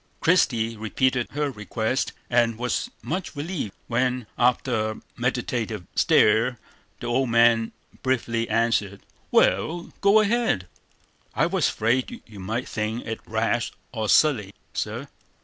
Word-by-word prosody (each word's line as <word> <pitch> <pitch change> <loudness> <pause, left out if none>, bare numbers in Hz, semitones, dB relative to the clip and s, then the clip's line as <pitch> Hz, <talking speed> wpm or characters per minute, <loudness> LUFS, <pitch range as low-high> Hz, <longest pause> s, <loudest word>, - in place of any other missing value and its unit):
Christie 120 -10 +2
repeated 125 +3 0
her 145 -1 -1
request, 110 +3 -2 0.2
and 120 -2 +2
was 125 - -1
much 185 -3 -3
relieved, 145 - -4
when, 125 0 0
after 120 -2 +1
a - - -13
meditative 120 -5 -2
stare, 115 +4 +4 0.4
the - - -7
old 125 +2 +1
man 115 -1 +4 0.3
briefly 115 -3 0
answered: 110 -4 +1 0.3
"Wal, 160 - +2
go 200 +2 +6
ahead." 215 - +1 0.7
"I - - +3
was - - +1
afraid 120 +4 -1
you 105 -3 -12
might 110 +6 -3
think 110 +2 -3
it 110 0 -4
rash 115 +1 0 0.2
or 110 -3 -3
silly, 110 -11 +3 0.2
sir." - - -3
120 Hz, 125 wpm, -25 LUFS, 110-130 Hz, 0.7 s, go